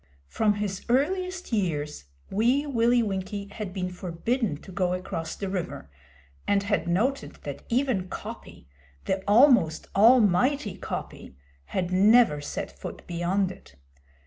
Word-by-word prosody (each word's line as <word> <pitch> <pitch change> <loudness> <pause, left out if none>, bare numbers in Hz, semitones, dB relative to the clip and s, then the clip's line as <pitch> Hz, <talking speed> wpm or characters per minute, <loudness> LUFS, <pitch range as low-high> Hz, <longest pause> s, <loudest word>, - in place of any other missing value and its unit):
From 210 - +1
his 200 -2 -3
earliest 365 +5 0
years, 150 - -1 0.3
Wee 245 +8 +2
Willie 240 -3 +3
Winkie 200 0 -4
had 205 -3 -5
been 185 -1 -3
forbidden 180 - -2
to 190 - -11
go 180 -1 0
across 165 -3 -5
the 200 - -4
river, 180 - -5 0.6
and 200 -1 +2
had 200 -4 0
noted 230 +11 0
that - - -6
even 240 -6 +1
Coppy - - -9 0.4
the 190 0 -1
almost 210 - +4
almighty 230 +2 +4
Coppy - - -7 0.3
had 180 - -2
never 200 -4 +5
set 145 - -5
foot - - -9
beyond 180 +3 0
it. 70 - -15
200 Hz, 130 wpm, -26 LUFS, 180-240 Hz, 0.6 s, never